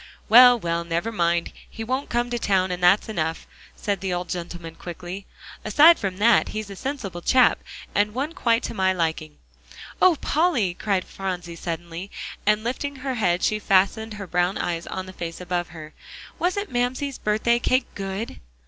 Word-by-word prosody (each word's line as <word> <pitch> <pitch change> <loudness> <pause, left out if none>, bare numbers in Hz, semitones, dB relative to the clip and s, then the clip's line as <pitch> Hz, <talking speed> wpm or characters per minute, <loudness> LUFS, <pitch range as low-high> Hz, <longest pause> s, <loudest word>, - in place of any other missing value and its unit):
"Well, 245 +2 +9
well, 170 -4 -2
never 170 +6 -2
mind, 170 -4 0 0.2
he 225 - -7
won't 260 +5 -2
come 240 0 -1
to 240 - -1
town, 190 -3 +1
and 180 0 -4
that's 180 +4 +4
enough," 165 -6 -2 0.3
said 200 -3 -2
the 190 -1 -2
old 180 0 -3
gentleman 175 -2 -6
quickly. 180 +3 -8 0.4
"Aside 305 +10 +6
from 190 -2 -3
that, 230 +3 +4
he's 215 -2 -5
a - - -7
sensible 205 -8 -5
chap, 255 +7 +4 0.3
and 205 +1 +1
one 285 +5 -2
quite 235 -9 +1
to - - -4
my 190 -3 +2
liking." 160 -3 -2 0.6
"Oh, 370 -3 +6
Polly!" 290 - +1
cried 195 0 -1
Phronsie 180 -3 -5
suddenly, 170 +2 -6 0.4
and 210 0 +3
lifting 280 +4 -3
her 265 0 -4
head, 185 -6 +1
she 215 - +1
fastened 210 +3 +2
her 200 -1 -6
brown 180 +1 0
eyes 170 -1 -3
on 185 0 -4
the 185 - -10
face 165 -2 -6
above 175 -1 -2
her, 155 -1 -11 0.5
"wasn't 395 +3 -1
Mamsie's 255 +3 -1
birthday 220 +3 +1
cake 255 +2 +2
good?" 195 - -5
195 Hz, 175 wpm, -24 LUFS, 175-240 Hz, 0.6 s, Well